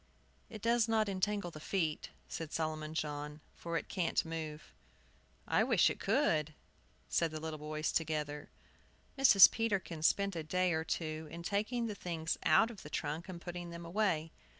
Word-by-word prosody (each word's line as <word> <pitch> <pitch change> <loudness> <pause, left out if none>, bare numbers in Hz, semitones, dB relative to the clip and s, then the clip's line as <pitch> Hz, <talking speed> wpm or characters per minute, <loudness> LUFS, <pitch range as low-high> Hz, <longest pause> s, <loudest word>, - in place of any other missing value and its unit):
"It 215 -3 -9
does 235 0 +3
not 220 -1 +2
entangle 195 -1 -1
the 155 - -9
feet," 160 -2 -1 0.2
said 160 -2 -5
Solomon 155 -1 -3
John, 150 -1 -3
"for 170 0 -3
it - - -4
can't 175 -4 0
move." 160 -1 -6 0.7
"I - - +3
wish - - +4
it - - -7
could," 155 - +1 0.5
said 165 - +1
the 155 0 -5
little 155 -1 -5
boys 155 +1 -2
together. 150 -2 -2 0.7
Mrs. 260 -8 +9
Peterkin 200 -8 -1
spent 200 +4 +2
a 165 - -2
day 180 +3 +1
or 160 0 0
two 155 -1 -3
in 170 +2 -8
taking 215 +5 -1
the 220 - -3
things 165 -4 -3
out 220 +9 +4
of 205 -4 -11
the - - -10
trunk 155 +4 -3
and 175 -2 -6
putting 175 0 -6
them 170 0 -8
away. 170 -4 0
165 Hz, 170 wpm, -34 LUFS, 155-200 Hz, 0.7 s, Mrs